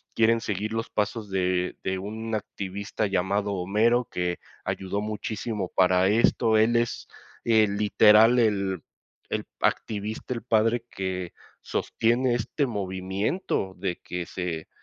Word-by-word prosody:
quieren 115 0 +4
seguir 105 +1 -3
los 115 0 -3
pasos 105 0 -2
de, 90 -1 +1
eh, - - -13
de 95 0 -1
un 110 +3 -5
activista 100 +1 -3
llamado 100 +2 0
Homero, 110 +6 +2
que 90 -1 -2 0.3
ayudó 95 +2 -2
muchísimo 105 -2 -3
para 90 0 +4
esto, 110 +1 +3
él 115 +2 +4
es, 120 0 -1 0.4
eh, 110 -2 +5
el 100 -1 -1
literal, 105 +3 +6
el 100 -5 +1 0.5
el - - -1 0.2
activista, 110 +3 -1
el 115 - -5
padre 115 0 +2
que 95 -2 -4 0.3
sostiene 120 +2 +1
este 120 +5 -1
movimiento 95 - -2
de 90 -2 -2
que 90 -1 -4
se 85 -3 -4
105 Hz, 135 wpm, -26 LUFS, 95-115 Hz, 0.5 s, literal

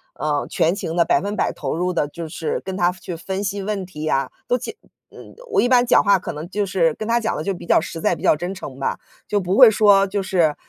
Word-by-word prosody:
呃， 150 -1 -1
全 165 +3 +1
情 165 -4 -4
地 170 - +4
100% 205 +1 0
投 140 -1 -4
入 180 +2 -1
地， 150 -3 0
就 165 +1 -7
是 160 +1 -3
跟 190 - -6
她 175 -2 +2
去 180 -1 -8
分 190 +4 -4
析 200 0 -3
问 195 -2 -3
题 155 -3 -6
啊， 135 -2 0 0.2
都 245 - +2
解 440 - -7 0.4
嗯， - - -13 0.2
我 410 - +3
一 245 - +1
般 245 -1 +5
讲 - - +4
话 200 -2 +4
可 180 - -6
能 155 +4 -7
就 205 +1 -1
是 170 -5 +1
跟 215 - -6
她 235 +1 +2
讲 225 - -1
得 - - -3
就 195 - -1
比 175 - -10
较 - - +4
实 165 0 -6
在、 - - +1
比 - - -13
较 - - +4
真 175 +5 -4
诚 140 -8 -9
吧。 - - -2 0.3
就 205 - +1
不 185 +1 -1
会 250 -2 +9
说 200 -2 +5
就 200 +1 -2
是， 170 -5 +1
185 Hz, 275 characters per minute, -21 LUFS, 165-205 Hz, 0.4 s, 会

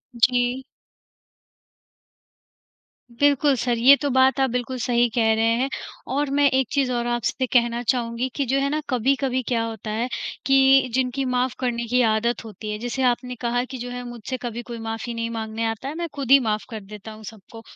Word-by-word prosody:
जी। 245 +2 +2 2.5
बिल्कुल 285 +2 +3
सर, 240 0 0
ये 255 +5 +8
तो 290 - 0
बात 260 0 +3
आप 265 -1 +3
बिल्कुल 250 +1 -3
सही 240 0 +2
कह 225 -2 +3
रहे 225 +1 +1 0.2
हैं 265 - +1 0.5
और 290 +1 0
मैं 285 0 +4
एक 260 -1 +1
चीज़ 275 -3 +1
और 240 -1 -1
आपसे 240 +2 -1
कहना 235 -1 +3
चाहूँगी 240 0 -1
कि 280 - 0
जो 265 +2 +1
है 275 0 0
ना 300 +2 -1
कभी-कभी 260 +1 +1
क्या 235 -2 +1
होता 225 -1 -5
है, 225 +3 -1 0.4
कि 270 -1 +5
जिनकी 260 +1 0
माफ़ 250 0 0
करने 235 -2 -1
की 250 +2 +2
आदत 230 +3 0
होती 215 0 -7
है 210 - -3
जैसे 245 +3 -3
आपने 250 0 0
कहा 245 0 0
कि 260 +1 -7
जो 245 0 -6
है 245 0 -5
मुझसे 240 +2 -6
कभी 240 -1 -4
कोई 235 -1 -6
माफ़ी 225 +1 -4
नहीं 230 0 -3
माँगने 225 0 -3
आता 225 +5 -7
है 295 - -5
मैं 340 +1 -3
खुद 270 -3 -3
ही 275 - +9
माफ़ 215 -4 -1
कर 220 -3 -6
देता 210 +2 -10
हूँ 215 0 -12
सबको। 220 +1 -11
245 Hz, 195 wpm, -23 LUFS, 230-265 Hz, 2.5 s, ही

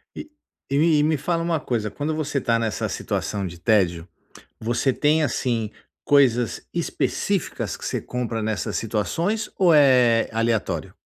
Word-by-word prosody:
E 305 - -8 0.4
e 140 - 0
me 155 -1 +4
me 155 -1 +2
fala 165 +4 -1
uma 165 -2 0
coisa, 110 -5 -2
quando 155 +2 -3
você 150 -2 -2
está 115 -3 +1
nessa 110 -3 -2
situação 100 -2 -3
de 85 0 -10
tédio, 90 -4 +1 0.5
você 120 +4 0
tem 155 +3 +2
assim 115 -6 -1 0.3
coisas 125 -5 +2
específicas - - -2
que - - -11
você - - -2
compra 120 -3 -3
nessas 110 -1 -2
situações 170 - -1
ou 180 -3 +5
é 125 -5 +5
aleatório? 115 -1 -1
125 Hz, 145 wpm, -23 LUFS, 110-150 Hz, 0.5 s, ou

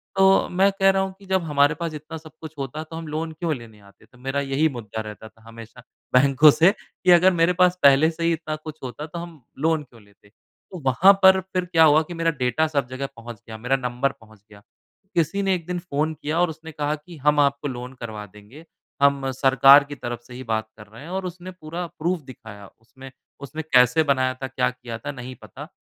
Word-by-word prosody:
तो 195 0 +4
मैं 195 +2 +3
कह 195 0 +5
रहा 195 0 +2
हूँ 190 0 -3
कि 200 - -16
जब 190 -1 0
हमारे 145 -1 +2
पास 170 -2 -3
इतना 155 +2 -8
सब 155 0 -13
कुछ 160 -1 -9
होता, 140 +3 -5
तो 160 +1 -11
हम 165 -1 -7
लोन 160 +2 -4
क्यों 165 0 -2
लेने 115 -4 -13
आते? 100 +1 -21
तो 120 - -23
मेरा 135 +2 -3
यही 140 +3 +1
मुद्दा 110 -4 -6
रहता 110 0 -9
था 110 - -27
हमेशा 115 +1 -12 0.3
बैंकों 135 +3 +6
से 170 +6 +4
कि 185 -3 -2
अगर 180 +2 +6
मेरे 170 +1 +2
पास 180 0 +4
पहले 140 +3 +6
से 165 +1 -6
ही 170 - +2
इतना 155 -1 -4
कुछ 155 0 -10
होता, 130 +4 -6
तो 165 +2 -8
हम 170 -4 -10 0.2
लोन 160 0 +1
क्यों 120 -4 -19
लेते? 100 0 -25
तो 180 - -15
वहाँ 175 +10 +6
पर 190 0 +7
फिर 185 -1 0
क्या 165 -2 +4
हुआ 155 0 +6
कि 175 - -9
मेरा 165 0 0
डेटा 125 +6 +1
सब 140 -5 -1
जगह 130 +2 -5
पहुँच 115 -1 -10
गया, 110 -1 -8
मेरा 125 +4 0
नंबर 125 +1 -1
पहुँच 110 -2 -19
गया। 100 -1 -16 0.5
किसी 170 +4 +1
ने 195 -1 +2
एक 170 -3 -7
दिन 180 0 -3
फ़ोन 160 -2 -2
किया 155 +3 -1
और 175 - +2
उसने 160 +1 -9
कहा 150 0 -2
कि, 160 +3 -14
"हम 150 +1 +2
आपको 140 0 +1
लोन 125 -1 -7
करवा 110 -3 -6
देंगे। 105 - -16 0.4
हम 140 -1 +2
सरकार 135 +2 +6
की 145 0 -9
तरफ 120 -2 -6
से 125 - -12
ही 130 - -8
बात 110 0 -1
कर 105 -2 -13
रहे 110 +4 -14
हैं।" 165 - -10
और 190 0 -4
उसने 180 +1 -7
पूरा 175 0 -7
प्रूफ़ 170 +1 -1
दिखाया 110 -6 -12
उसमें। 130 +4 -14 0.3
उसने 145 +3 -6
कैसे 125 -1 +4
बनाया 130 -3 +1
था, 130 +1 -6
क्या 125 -1 0
किया 125 -2 -8
था, 115 - -6
नहीं 125 -1 -9
पता - - -10
145 Hz, 230 wpm, -23 LUFS, 125-165 Hz, 0.5 s, पर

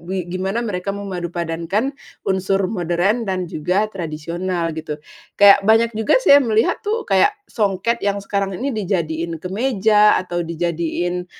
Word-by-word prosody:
bi 185 +1 -4
gimana 190 +4 -2
mereka 200 -2 -3
memadupadankan 175 - -3 0.3
unsur 190 0 +1
modern 180 +5 0
dan 185 -1 -1
juga 180 +6 0
tradisional, 170 0 -3
gitu. 155 -2 -5 0.4
Kayak 200 0 +8
banyak 225 +2 +3
juga 220 - +2
saya 285 0 +8
melihat 225 -2 +1
tuh, 445 +2 -2
kayak 410 - +4 0.2
songket 210 +1 -1
yang 200 0 0
sekarang 195 -1 -2
ini 270 +2 -2
dijadiin 170 -5 -2
kemeja 210 - +3
atau 175 -1 -3
dijadiin 170 +1 -2
190 Hz, 130 wpm, -20 LUFS, 175-210 Hz, 0.4 s, Kayak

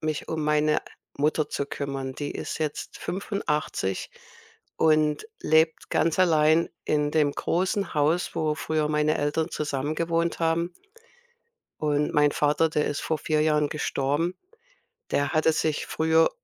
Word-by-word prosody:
mich 155 -1 -3
um 160 -1 -2
meine 150 0 +2 0.4
Mutter 150 +1 +1
zu 140 - -2
kümmern? 135 -2 -4
Die 145 +1 -4
ist - - -5
jetzt 155 -2 -4
85 155 - -2 0.7
und 155 - +2
lebt 160 +1 +2
ganz 165 +1 +1
allein 160 -2 +4 0.2
in 150 -1 +1
dem 150 -2 +2
großen 190 +6 -1
Haus, 155 +3 +1
wo 155 -2 0
früher 150 +1 -1
meine 150 0 +1
Eltern 155 +3 0
zusammen 145 0 -2
gewohnt 170 +1 0
haben. 170 +1 0 1.1
Und 150 -1 +1
mein 150 -1 +4
Vater, 150 +2 +2
der 150 -1 0
ist 145 - -2
vor 160 - -1
4 155 0 0
Jahren 150 -1 +2
gestorben. 150 +3 -1 0.8
Der 145 -1 +1
hatte 155 +1 +3
sich 155 -1 -1
früher 160 0 +3
155 Hz, 140 wpm, -26 LUFS, 150-160 Hz, 1.1 s, allein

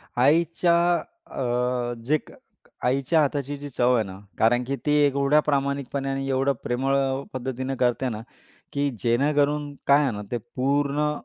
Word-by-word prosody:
आईच्या 165 +6 +3 0.5
अ, 125 - -1
जे 150 +5 +3
क - - -13 0.5
आईच्या 135 +6 +2
हाताची 145 -1 -1
जी 145 +1 -8
चव 125 -1 +2
आहे 115 - +2
ना, 95 -1 -9 0.2
कारण 120 +2 +3
की 135 +3 -2
ती 150 - +2
एवढ्या 140 +1 +3
प्रामाणिकपणे 140 -1 -1
आणि 135 0 -2
एवढं 135 +1 +2
प्रेमळ 135 +3 0 0.4
पद्धतीने 130 +1 -3
करते 125 +1 +1
ना, 110 -2 -5 0.5
की 140 0 +1
जेणेकरून 145 +4 +1
काय 140 +1 +6
आहे 135 - +1
ना, 105 -2 -5
ते 120 - 0 0.2
पूर्ण 145 +3 +1
135 Hz, 150 wpm, -25 LUFS, 125-145 Hz, 0.5 s, काय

